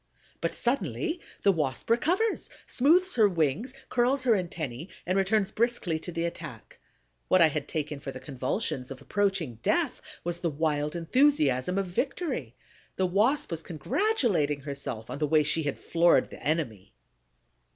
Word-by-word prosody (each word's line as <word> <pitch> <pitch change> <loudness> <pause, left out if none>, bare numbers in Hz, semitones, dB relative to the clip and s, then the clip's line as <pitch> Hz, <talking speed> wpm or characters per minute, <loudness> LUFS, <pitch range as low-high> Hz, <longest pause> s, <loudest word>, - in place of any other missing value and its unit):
But - - -1
suddenly 220 - 0 0.2
the 200 - +6
Wasp 150 -7 -2
recovers, 350 - +1 0.2
smooths 350 +8 +3
her 215 -4 +5
wings, 170 - 0 0.2
curls 255 +2 +2
her 250 - +3
antennæ, 165 - -2 0.2
and 185 - 0
returns 195 +1 +2
briskly 225 -8 0
to 175 - -6
the 165 0 -1
attack. 170 - -7 0.5
What 185 - +4
I 165 -2 +7
had 150 -1 -3
taken 150 -2 -3
for 140 - -6
the 130 - -8
convulsions 130 - -3
of 135 -2 -7
approaching 190 - -1
death - - +1 0.2
was 175 0 -3
the 175 -1 0
wild 150 0 -1
enthusiasm 185 - +2
of 195 - +1
victory. 185 - -2 0.4
The 190 - +1
Wasp 210 +10 +2
was 165 -1 -2
congratulating 175 - 0
herself 140 -6 -5
on - - -5
the 150 - +1
way 155 0 +4
she 155 +2 +2
had 145 -3 -2
floored 170 0 +3
the - - -10
enemy. 120 - -2
170 Hz, 155 wpm, -28 LUFS, 145-225 Hz, 0.5 s, I